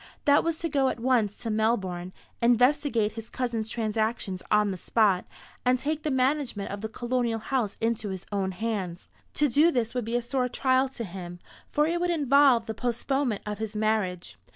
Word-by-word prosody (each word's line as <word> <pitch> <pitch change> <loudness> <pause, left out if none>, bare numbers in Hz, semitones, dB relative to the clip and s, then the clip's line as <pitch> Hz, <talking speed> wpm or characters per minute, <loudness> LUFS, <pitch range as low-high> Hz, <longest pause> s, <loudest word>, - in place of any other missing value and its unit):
That 285 0 +5
was 330 -1 -1
to 335 - -2
go 275 -3 +2
at - - -4
once 230 -4 +2
to 230 -2 -4
Melbourne, 195 -5 0 0.3
investigate 240 -1 +3
his 225 +1 -8
cousin's 235 -4 -2
transactions 220 -4 -1
on 210 -1 +3
the 185 - -4
spot, 200 -4 +2 0.4
and 250 0 +3
take 300 +4 -2
the 305 - -2
management 260 -6 0
of 200 0 -5
the 220 - -4
colonial 240 0 -1
house 225 -2 -2
into 225 -2 -1
his 190 -1 -6
own 195 -2 -1
hands. 190 -3 -4 0.3
To 295 - +3
do 290 +6 +4
this 240 -8 -1
would 250 -3 -2
be 230 +2 -2
a 240 - +2
sore 250 +1 -1
trial 260 +1 +2
to 250 -3 -6
him, 175 -3 -7 0.3
for 295 - +2
it 340 +2 0
would 355 - +1
involve 280 -6 +4
the 220 - -4
postponement 245 +1 -1
of 210 -1 -4
his 220 -1 -4
marriage. 210 - -1
230 Hz, 190 wpm, -27 LUFS, 210-260 Hz, 0.4 s, That